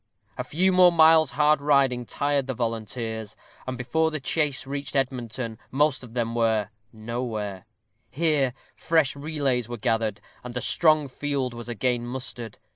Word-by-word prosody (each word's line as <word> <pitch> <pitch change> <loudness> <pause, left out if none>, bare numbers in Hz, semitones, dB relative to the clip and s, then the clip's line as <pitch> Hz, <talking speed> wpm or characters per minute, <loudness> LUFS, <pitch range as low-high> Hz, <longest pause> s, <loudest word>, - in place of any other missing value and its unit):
A - - -3
few 185 +5 +1
more 180 -1 +6
miles' 160 -3 +5
hard 150 0 +3
riding 135 -4 +2
tired 140 +2 0
the 130 - -3
volunteers, 110 -1 -4 0.3
and 130 -1 -3
before 145 +6 +1
the 155 -1 -3
chase 145 -1 -1
reached 140 0 -5
Edmonton 120 -3 -2
most 145 -1 +1
of 120 -1 -12
them 115 -1 -1
were 110 -2 +1 0.2
"nowhere." 110 -4 -5 0.4
Here 145 -5 +1 0.2
fresh 160 -5 +1
relays 140 -5 -1
were 120 - -4
gathered, 110 -1 0 0.2
and 125 0 -6
a - - +1
strong 155 0 +3
field 135 -1 -2
was 120 0 -8
again 120 +1 -1
mustered. 120 -3 -6
130 Hz, 150 wpm, -25 LUFS, 115-145 Hz, 0.4 s, more